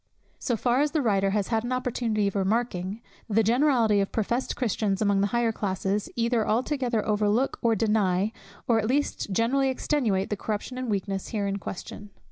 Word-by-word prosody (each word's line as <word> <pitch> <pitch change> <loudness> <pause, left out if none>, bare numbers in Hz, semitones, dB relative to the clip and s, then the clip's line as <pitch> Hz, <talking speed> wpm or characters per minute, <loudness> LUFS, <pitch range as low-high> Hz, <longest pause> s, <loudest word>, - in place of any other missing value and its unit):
So 240 -4 -1
far 245 +4 +2
as 295 0 0
the 310 - +2
writer 195 -4 +2
has 200 -1 -1
had 225 -2 +1
an 240 - -4
opportunity 235 -4 0
of 200 - -3
remarking, 200 0 -1 0.3
the 220 +1 +3
generality 235 -3 +3
of 195 - -2
professed 235 +4 -1
Christians 210 -4 0
among 200 -2 +2
the 200 - +2
higher 235 +1 +1
classes, 200 -1 -2
either 235 -1 +1
altogether 245 -1 0
overlook 210 +4 +1
or 230 -1 +3
deny, 210 -2 +1 0.4
or 230 -3 +4
at 220 - -1
least 270 -4 -1
greatly 260 +7 +2
extenuate 235 -8 0
the 210 - -1
corruption 220 +5 -4
and 255 -2 -3
weakness 195 -1 -2
here 210 -3 -2
in 200 0 -1
question. 200 +2 -7
220 Hz, 180 wpm, -26 LUFS, 200-240 Hz, 0.4 s, or